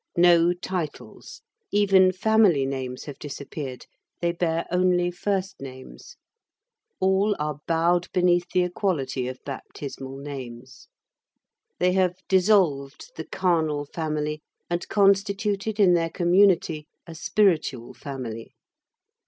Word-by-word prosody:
No 170 0 +5
titles. 175 -3 -6 0.3
Even 195 -2 +5
family 190 -7 +3
names 130 -2 -4
have 145 -3 -9
disappeared. 140 -2 -7 0.3
They 170 0 +1
bear 170 -1 -1
only 180 -1 +2
first 190 0 -3
names. 130 - -11 0.8
All 190 +2 +2
are 150 -1 -3
bowed 170 +1 +1
beneath 175 -1 +2
the 180 - +3
equality 150 -9 -2
of 130 0 -5
baptismal 135 -1 -7
names. 130 -3 -9 0.9
They 180 0 +2
have 185 -1 +2
dissolved 185 - +2
the - - -6
carnal 160 -5 0
family, 150 0 -3 0.3
and 175 +1 -2
constituted 200 +1 +1
in 190 -3 +6
their 165 -1 +1
community 175 -3 +2 0.2
a 165 - -9
spiritual 160 - 0
family. 125 -5 -7
170 Hz, 110 wpm, -25 LUFS, 140-185 Hz, 0.9 s, in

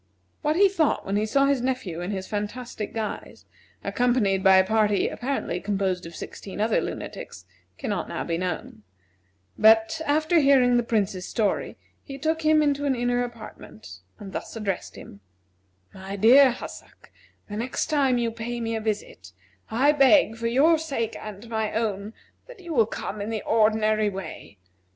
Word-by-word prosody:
What 300 0 +1
he 400 +3 +6
thought 335 -6 0
when 195 - -2
he 210 +1 +1
saw 275 +5 +3
his 275 -2 +1
nephew 250 -10 -3
in 175 - -4
his 190 -2 -4
fantastic 210 +1 -5
guise, 220 -2 -6 0.4
accompanied 235 -6 +1
by 190 -1 +7
a 190 - +5
party 210 -1 +2
apparently 245 -9 -3
composed 190 -3 -1
of 165 - -11
sixteen 195 0 -8
other 215 +1 +2
lunatics, 90 - -7 0.3
cannot 200 -5 -3
now - - -3
be 165 - -2
known; 180 -10 -4 0.8
but, 225 +9 +5
after 310 +3 +3
hearing 265 -4 +4
the 240 - +4
Prince's 200 -5 -1
story, 215 -4 -1 0.3
he 275 -2 -8
took 320 +3 -1
him 310 -1 +4
into 285 -1 0
an 275 -2 +1
inner 245 0 0
apartment, 165 - -10 0.2
and 195 -2 -10
thus - - -6
addressed 200 -4 -4
him: 100 - -12 0.7
"My 190 +1 -7
dear 255 +7 +7
Hassak: 240 - -11 0.4
The 205 - -6
next 240 +3 -2
time 275 -5 +2
you 235 -1 0
pay 235 +1 -5
me 230 -1 -2
a 220 - -3
visit, 215 -1 -5 0.4
I 255 +6 +3
beg 275 -5 +4
for 230 0 -3
your 300 +7 +4
sake 270 -8 -3
and 215 +1 -9
my 220 -2 -2
own, 215 -1 -2 0.3
that - - -13
you 345 -3 -7
will 230 -6 +3
come 210 -1 -5
in 205 - -4
the 220 -2 -3
ordinary 215 -1 +2
way. 190 - -8
225 Hz, 170 wpm, -25 LUFS, 205-270 Hz, 0.8 s, by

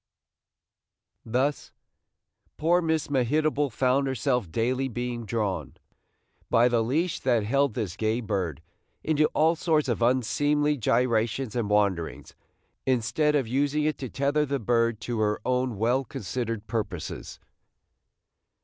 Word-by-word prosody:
Thus 130 +6 -1 0.9
poor 175 +3 +3
Miss 160 -2 0
Mehitable 145 +2 +1
found 130 +4 +1
herself 125 - -1
daily 125 +6 0
being 120 -2 -4
drawn, 100 - -2 0.7
by 115 +1 +5
the 120 -1 +2
leash 155 +9 0
that 120 -4 +1
held 140 +2 +1
this 100 -8 -3
gay 110 +1 0
bird, 95 - -3 0.4
into 155 -1 +3
all 160 +2 +4
sorts 155 -3 +1
of 120 -2 -1
unseemly 145 +5 +2
gyrations 120 -1 0
and 115 -4 -1
wanderings, 100 -5 0 0.5
instead 130 +4 +1
of 135 -5 +1
using 145 +4 +1
it 155 0 -1
to 130 - -5
tether 140 +4 +1
the 140 -1 -1
bird 115 -1 +1
to 120 +1 -3
her 105 -1 +1
own 125 -3 0
well 120 +5 +1
considered 115 0 -4
purposes. 105 -9 -5
125 Hz, 125 wpm, -27 LUFS, 110-140 Hz, 0.9 s, by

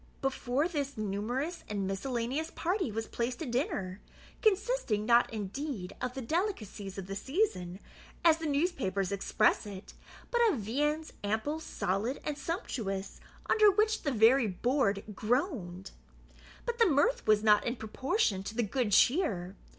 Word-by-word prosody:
Before 270 +2 0
this 285 -6 -3
numerous 220 - -2
and 200 -2 -2
miscellaneous 245 - -2
party 360 - -1
was 225 +1 -3
placed 240 +1 -3
a - - -4
dinner, 240 - -2 0.4
consisting, 415 - +1
not 235 +1 +4
indeed 215 -1 -4
of 250 0 -3
the 265 - -4
delicacies 225 - -3
of 195 - -5
the 195 +1 -5
season, 200 - -1 0.5
as 325 -1 +6
the 320 - -3
newspapers 275 - 0
express 210 +2 +2
it, 195 -1 -9 0.4
but 475 - +2
of 345 - 0
viands, 295 +9 -1
ample, 220 +10 -1
solid, 225 - -2
and 300 - -2
sumptuous, 230 - -4 0.3
under 425 -1 +6
which 430 +2 +2
the 285 - -1
very 235 +1 +5
board 205 0 +1
groaned. 210 - -1 0.7
But 475 -1 -3
the 460 - +6
mirth 335 - +2
was 215 0 +4
not 210 -1 +5
in 235 - -1
proportion 235 - 0
to 210 +3 -6
the 240 - +1
good 220 0 -1
cheer. 200 - +3
245 Hz, 145 wpm, -31 LUFS, 205-315 Hz, 0.7 s, as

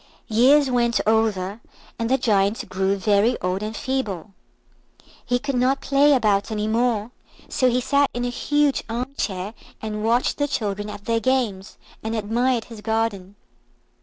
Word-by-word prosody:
Years 260 +5 +5
went 235 -3 +2
over, 215 -2 +1 0.4
and 230 0 -1
the 265 - +3
Giant 205 -3 +1
grew 190 +1 0
very 205 +4 +2
old 185 +2 -2
and 215 +1 -4
feeble. 215 -8 -3 0.9
He 245 - +1
could 275 +2 -3
not 255 +2 +2
play 285 +1 +4
about 210 -5 +2
any 215 -1 -2
more, 230 -1 0 0.4
so 255 - +2
he 250 +1 +1
sat 280 +2 +2
in 245 0 -3
a - - -1
huge 290 +2 +1
armchair, 225 -5 -3 0.3
and 215 -1 -4
watched 235 +3 +1
the 290 - +1
children 205 -6 -3
at 205 0 -9
their 230 0 +1
games, 225 -6 -1 0.2
and 220 +1 -3
admired 230 +3 0
his 225 -3 -11
garden. 215 -3 -2
225 Hz, 155 wpm, -23 LUFS, 205-250 Hz, 0.9 s, Years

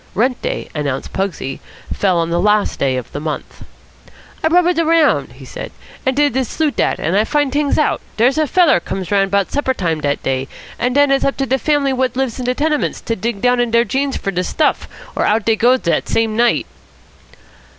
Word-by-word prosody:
Rent 250 +4 +1
day, - - -3
announced 140 -3 -3
Pugsy, 180 -8 -3 0.3
fell 185 -3 +1
on 165 0 0
the 170 - +1
last 210 +1 +1
day 130 -2 +1
of 125 - -6
the 145 - -5
month. 155 0 -6 0.8
"I - - +4
rubbered 350 0 +3
around," 330 -1 +2
he - - -13
said, - - -7 0.4
"and 260 - +2
did 290 -2 +2
de 265 +1 +1
sleut' 300 +3 -2
act, - - +1
and 170 - -1
I 210 - +4
finds 290 +2 0
t'ings 290 -1 +1
out. - - +1 0.2
Dere's 250 +7 +3
a 310 - +2
feller 335 - +4
comes 185 +2 -5
round 195 -1 +2
'bout 200 -1 0
supper 270 -2 0
time 165 -6 -1
dat 145 -1 -1
day, 135 0 -1 0.3
an' 245 +1 0
den 285 0 +4
it's 275 - +2
up 275 - 0
to 270 - 0
de 265 +1 0
fam'lies 285 0 +1
what 260 -1 -1
lives 265 -2 -1
in 250 - -3
de 250 +1 0
tenements 300 +1 0
to 230 - -2
dig 215 0 -3
down 250 0 +3
into 240 -1 0
deir 235 - +4
jeans 270 +5 -1
fer 195 - -3
de 180 -1 -1
stuff, 300 - 0 0.3
or - - 0
out 210 0 +1
dey 225 - +3
goes 245 +4 +3
dat 170 - 0
same 225 -1 +1
night." 235 +1 +2
240 Hz, 220 wpm, -17 LUFS, 195-275 Hz, 0.8 s, I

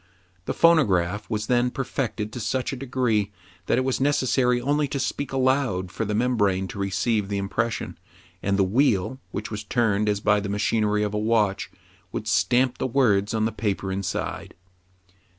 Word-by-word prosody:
The - - -3
phonograph 105 - +3
was 105 -2 -2
then 125 +2 +2
perfected 120 -5 -3
to 125 - -5
such 130 +4 -1
a - - -2
degree, 125 -6 0 0.4
that - - +2
it 130 - +2
was 130 0 -1
necessary 130 -3 +2
only 145 +3 +1
to 140 - -3
speak 140 +1 -2
aloud 130 -9 +1
for 115 - -3
the 105 0 -2
membrane 105 -5 +1
to 100 - -7
receive 100 +2 0
the 100 - -1
impression, 115 +4 -2 0.4
and 100 0 0
the 100 - +4
wheel, 115 +2 +1
which 105 - -5
was 105 0 -4
turned 105 -2 +1
as 105 -1 0
by 105 0 +3
the 100 0 -4
machinery 105 +1 +1
of 105 0 -2
a 105 - 0
watch, 105 -3 +1 0.4
would - - -5
stamp 125 0 +2
the - - 0
words 115 -6 +2
on 110 0 +1
the 110 - 0
paper 100 -3 -2
inside. 95 -1 -4
110 Hz, 175 wpm, -24 LUFS, 100-130 Hz, 0.4 s, the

